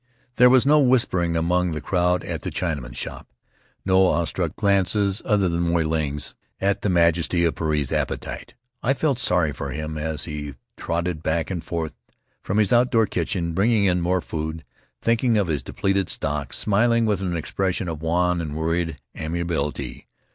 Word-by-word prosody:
There 125 0 +7
was 130 0 +5
no 150 +2 +5
whispering 115 - +2
among 90 +1 +1
the 75 - -3
crowd 90 +1 +1
at - - -4
the - - -3
Chinaman's 75 -8 -3
shop, - - -6 0.6
no 95 0 +5
awestruck 85 0 -1
glances 100 0 +1
other 100 -3 +2
than 85 -1 -1
Moy 85 -1 +2
Ling's, 75 -2 -2 0.3
at 100 +1 0
the 105 - 0
majesty 85 0 +3
of 85 - +1
Puarei's 75 -4 -1
appetite. - - -3 0.3
I 135 +3 +2
felt 140 -4 0
sorry 90 - +2
for 70 -1 -5
him 75 +3 -4
as 75 -1 -3
he 75 -3 -5 0.2
trotted 85 -1 -2
back 80 +3 -1
and 85 -3 -3
forth 80 -2 -3 0.5
from 100 - -2
his 105 -1 +3
outdoor 120 -2 +4
kitchen, 85 -2 -2
bringing 105 +3 +3
in 90 -2 +2
more 90 +1 +1
food, 80 0 -5 0.4
thinking 115 0 +2
of 100 - +2
his 75 -3 0
depleted 95 -2 -1
stock, 70 -2 -2
smiling 115 +5 +2
with 105 -3 0
an 90 -3 -1
expression 90 +3 -1
of 80 -2 -5
wan 90 +1 +1
and 75 -2 -5
worried 80 +1 -1 0.2
amiability. 75 -5 -3
85 Hz, 170 wpm, -23 LUFS, 80-100 Hz, 0.6 s, There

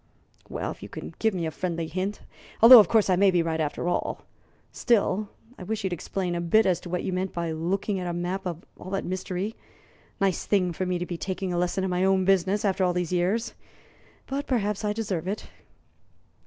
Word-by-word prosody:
"Well, - - -3
if - - -11
you - - -8
can - - -8
give 220 -3 +1
me 170 -2 -2
a 160 - -2
friendly 170 -1 -3
hint, 185 +5 -3 0.4
although, 235 +2 +11
of 210 - +6
course, 220 -2 +3
I 185 - +3
may 195 +2 +5
be 175 -2 +2
right, 160 -1 -1
after 150 +3 -2
all. 175 - -2 0.5
Still, 210 -3 +1 0.3
I - - -7
wish 220 +3 -3
you'd 190 -2 -1
explain 180 +1 -3
a 170 - -2
bit 210 +6 +4
as 180 -3 +2
to 180 - -10
what 180 0 -2
you 190 - -2
meant 185 +1 -2
by 170 -1 -2
looking 190 +5 -1
at 180 - -4
a - - -1
map 180 +2 -3
and 170 -1 -6
all 185 - -9
that 195 0 -2
mystery. 185 +3 -3 0.6
Nice 195 -3 0
thing 180 -4 +2
for 185 +3 -3
me 180 -1 0
to 175 - -3
be 175 -1 -5
taking 185 -1 -3
a - - -1
lesson 180 +2 0
in 190 - -1
my 180 +1 +1
own 190 -1 +3
business 195 +2 +2
after 195 -1 +1
all 180 -1 +2
these 180 -1 -2
years! 195 +7 0 0.7
But 275 +1 -4
perhaps 210 -5 0
I 210 - +1
deserve 200 -6 -3
it." 200 +2 -4
185 Hz, 220 wpm, -26 LUFS, 175-200 Hz, 0.7 s, although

